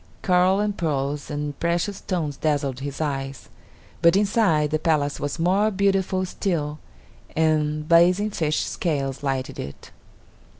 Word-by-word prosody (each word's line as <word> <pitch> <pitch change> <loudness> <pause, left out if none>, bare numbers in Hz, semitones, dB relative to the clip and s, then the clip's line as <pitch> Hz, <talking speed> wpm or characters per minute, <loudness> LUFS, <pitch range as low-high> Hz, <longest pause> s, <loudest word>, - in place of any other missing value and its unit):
Coral 185 +1 +3
and 205 -1 0
pearls 145 -4 -2
and 145 -1 -4
precious 175 +4 0
stones 160 -6 -3
dazzled 140 -4 -1
his 140 0 -5
eyes; 135 -3 -3 0.5
but 170 +1 +5
inside, 195 -7 +2
the 155 - +1
palace 150 -3 +1
was 145 +2 -3
more 190 +6 +2
beautiful 195 -2 +1
still, 155 -5 -2 0.6
and 155 -1 +1
blazing 180 +5 +4
fish 155 -5 0
scales 140 -6 -2
lighted 135 -2 -2
it. 70 - -8
155 Hz, 130 wpm, -24 LUFS, 145-185 Hz, 0.6 s, but